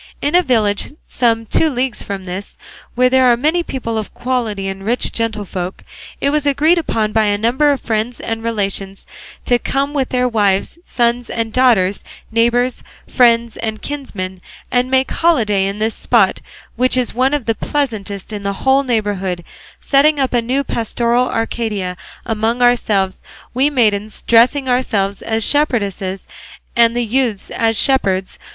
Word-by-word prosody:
In 290 Hz, -, -1 dB
a 355 Hz, -, +6 dB
village 225 Hz, -, 0 dB
some 230 Hz, -2 st, +1 dB
two 320 Hz, +8 st, +2 dB
leagues 255 Hz, -2 st, -2 dB
from 195 Hz, -2 st, -5 dB
this, 185 Hz, +3 st, -6 dB, 0.4 s
where 250 Hz, +1 st, +4 dB
there 255 Hz, -1 st, +4 dB
are 235 Hz, -, +3 dB
many 310 Hz, +7 st, +1 dB
people 230 Hz, -8 st, -3 dB
of 215 Hz, -, -7 dB
quality 230 Hz, -6 st, -2 dB
and 195 Hz, 0 st, -5 dB
rich 235 Hz, +4 st, 0 dB
gentlefolk, 205 Hz, -5 st, -3 dB, 0.4 s
it 280 Hz, -, +1 dB
was 295 Hz, -1 st, 0 dB
agreed 305 Hz, +5 st, +3 dB
upon 220 Hz, -9 st, -1 dB
by 220 Hz, 0 st, +2 dB
a 205 Hz, 0 st, +1 dB
number 245 Hz, +8 st, +2 dB
of 280 Hz, -, -1 dB
friends 225 Hz, +2 st, -2 dB
and 225 Hz, 0 st, -4 dB
relations 200 Hz, -3 st, -3 dB, 0.4 s
to 245 Hz, -1 st, +3 dB
come 275 Hz, +3 st, -1 dB
with 270 Hz, -3 st, -1 dB
their 250 Hz, 0 st, +1 dB
wives, 205 Hz, -, 0 dB
sons 240 Hz, 0 st, 0 dB
and 225 Hz, -1 st, -3 dB
daughters, 220 Hz, -7 st, +3 dB, 0.3 s
neighbours, 240 Hz, +2 st, +1 dB, 0.2 s
friends 235 Hz, -2 st, +3 dB
and 220 Hz, -1 st, -4 dB
kinsmen, 190 Hz, -11 st, -5 dB, 0.3 s
and 250 Hz, +1 st, +1 dB
make 265 Hz, 0 st, +2 dB
holiday 215 Hz, -, +2 dB
in 200 Hz, +1 st, -4 dB
this 220 Hz, +1 st, -1 dB
spot, 220 Hz, -6 st, +2 dB, 0.3 s
which 255 Hz, +2 st, +2 dB
is 250 Hz, -2 st, 0 dB
one 260 Hz, +4 st, +2 dB
of 280 Hz, -6 st, -3 dB
the 225 Hz, -, +1 dB
pleasantest 215 Hz, -6 st, -3 dB
in 205 Hz, -, -4 dB
the 200 Hz, 0 st, -2 dB
whole 265 Hz, +1 st, +5 dB
neighbourhood, 205 Hz, -8 st, -2 dB, 0.4 s
setting 290 Hz, +1 st, +3 dB
up 265 Hz, -2 st, 0 dB
a 240 Hz, -, +3 dB
new 260 Hz, +4 st, -1 dB
pastoral 235 Hz, +1 st, 0 dB
Arcadia 220 Hz, -5 st, -2 dB, 0.3 s
among 225 Hz, +2 st, -1 dB
ourselves, 210 Hz, -6 st, +1 dB, 0.3 s
we 265 Hz, +4 st, +2 dB
maidens 215 Hz, -6 st, 0 dB
dressing 255 Hz, +4 st, +4 dB
ourselves 205 Hz, -6 st, 0 dB
as 225 Hz, 0 st, -1 dB
shepherdesses 200 Hz, -10 st, 0 dB, 0.5 s
and 235 Hz, -1 st, +4 dB
the 240 Hz, -, +1 dB
youths 230 Hz, -3 st, -1 dB
as 225 Hz, -1 st, +1 dB
shepherds. 195 Hz, -9 st, +1 dB
230 Hz, 160 wpm, -17 LUFS, 205-255 Hz, 0.5 s, a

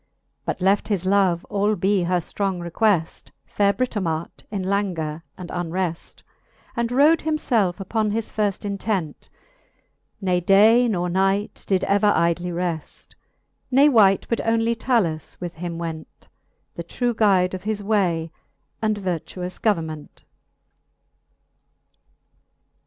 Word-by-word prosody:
But -, -, -3 dB
left 195 Hz, +2 st, +2 dB
his 195 Hz, -4 st, -1 dB
love, 185 Hz, -3 st, +2 dB
albe 200 Hz, -2 st, +1 dB
her 180 Hz, 0 st, +2 dB
ftrong 190 Hz, +2 st, -2 dB
requeft, 175 Hz, -3 st, 0 dB, 0.2 s
Faire 200 Hz, -1 st, +2 dB
Britomart 190 Hz, -9 st, -3 dB
in 200 Hz, -3 st, -3 dB
languor 175 Hz, -5 st, -2 dB
and 180 Hz, -2 st, -8 dB
unreft, 175 Hz, -1 st, -4 dB, 0.5 s
And 235 Hz, 0 st, -1 dB
rode 295 Hz, +6 st, +4 dB
him 310 Hz, -1 st, 0 dB
felfe 210 Hz, -11 st, +1 dB
uppon 210 Hz, +2 st, -1 dB
his 225 Hz, +1 st, -2 dB
firft 205 Hz, -2 st, -2 dB
intent: 200 Hz, -6 st, -3 dB, 0.9 s
Ne 185 Hz, -3 st, +1 dB
day 220 Hz, +6 st, +5 dB
or 180 Hz, -3 st, -1 dB
night 195 Hz, +3 st, 0 dB
did 190 Hz, -2 st, +1 dB
ever 205 Hz, +1 st, +3 dB
idly 170 Hz, +1 st, +1 dB
reft 170 Hz, -3 st, -5 dB, 0.3 s
*, -, -, -48 dB
Ne 285 Hz, +2 st, +7 dB
wight 200 Hz, -7 st, +4 dB
but 230 Hz, -, -1 dB
onely 225 Hz, +1 st, +1 dB
Talus 220 Hz, -, -1 dB
with 175 Hz, -1 st, -5 dB
him 170 Hz, 0 st, -5 dB
went, 165 Hz, -2 st, -7 dB, 0.5 s
The -, -, -6 dB
true 240 Hz, +8 st, -1 dB
guide 190 Hz, -5 st, +3 dB
of 185 Hz, -, -4 dB
his 210 Hz, 0 st, -3 dB
way 180 Hz, -6 st, 0 dB, 0.5 s
and 215 Hz, -1 st, +1 dB
vertuous 180 Hz, -1 st, -5 dB
government. 160 Hz, -8 st, -2 dB
195 Hz, 125 wpm, -23 LUFS, 175-215 Hz, 0.9 s, Ne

